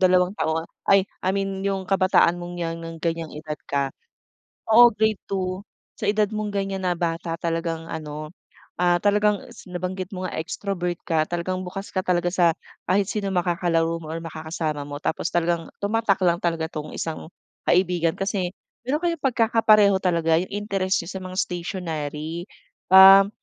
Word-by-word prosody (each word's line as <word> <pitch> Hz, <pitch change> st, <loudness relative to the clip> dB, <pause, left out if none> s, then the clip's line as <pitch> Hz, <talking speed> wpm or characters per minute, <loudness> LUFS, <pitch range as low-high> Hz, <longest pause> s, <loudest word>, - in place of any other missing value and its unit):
dalawang 185 Hz, 0 st, +4 dB
taon, 160 Hz, -5 st, -1 dB, 0.2 s
ay, 195 Hz, -1 st, +6 dB, 0.2 s
I 185 Hz, -, -1 dB
mean 195 Hz, 0 st, -2 dB
yung 195 Hz, -1 st, -1 dB
kabataan 185 Hz, -2 st, +3 dB
mong 175 Hz, 0 st, -7 dB
'yan, 165 Hz, -1 st, -3 dB
nung 165 Hz, 0 st, -7 dB
ganiyang 165 Hz, 0 st, -2 dB
edad 150 Hz, -1 st, -6 dB
ka. 140 Hz, -1 st, 0 dB, 0.8 s
Oo, 235 Hz, +1 st, +8 dB
grade 215 Hz, -1 st, +1 dB
2, 190 Hz, 0 st, -3 dB, 0.3 s
sa 215 Hz, -, -3 dB
edad 210 Hz, 0 st, +2 dB
mong 210 Hz, -1 st, -3 dB
ganiyan 195 Hz, -1 st, -2 dB
na 180 Hz, -, +2 dB
bata, 165 Hz, -1 st, -2 dB
talagang 165 Hz, -1 st, -3 dB
ano, 155 Hz, -1 st, -6 dB, 0.5 s
ah, 175 Hz, -1 st, +2 dB
talagang 210 Hz, 0 st, +2 dB
si 180 Hz, -, -13 dB
nabanggit 185 Hz, +2 st, -4 dB
mo 185 Hz, -, -5 dB
nga, 185 Hz, -, -4 dB
extrovert 175 Hz, +1 st, -3 dB
ka. 155 Hz, -2 st, +1 dB
Talagang 185 Hz, +2 st, -3 dB
bukas 195 Hz, +2 st, -6 dB
ka -, -, -3 dB
talaga 175 Hz, -1 st, +1 dB
sa 175 Hz, -2 st, +3 dB, 0.3 s
kahit 195 Hz, +2 st, +2 dB
sinong 200 Hz, -2 st, -2 dB
makakalaro 170 Hz, -2 st, +1 dB
mo 165 Hz, -, -11 dB
or 165 Hz, +1 st, -5 dB
makakasama 155 Hz, -2 st, -4 dB
mo, 145 Hz, +1 st, -7 dB
tapos 160 Hz, -, -1 dB
talagang 170 Hz, -1 st, +1 dB, 0.2 s
tumatak 205 Hz, -1 st, +1 dB
lang 170 Hz, -1 st, +3 dB
talaga 165 Hz, -2 st, -1 dB
'tong 155 Hz, -2 st, -6 dB
isang 160 Hz, -1 st, -4 dB, 0.4 s
kaibigan 175 Hz, -2 st, +2 dB
kasi 195 Hz, -2 st, -2 dB, 0.3 s
meron 295 Hz, +5 st, 0 dB
kayong 340 Hz, -2 st, 0 dB
pagkakakapareho 225 Hz, -5 st, +4 dB
talaga, 165 Hz, -3 st, +2 dB
yung 180 Hz, -, -4 dB
interest 195 Hz, -3 st, 0 dB
niyo 170 Hz, -, -9 dB
sa 190 Hz, -, -5 dB
mga 185 Hz, 0 st, -7 dB
stationary. 170 Hz, -3 st, -3 dB, 0.4 s
Um, 195 Hz, +1 st, +9 dB
180 Hz, 165 wpm, -24 LUFS, 165-195 Hz, 0.8 s, Um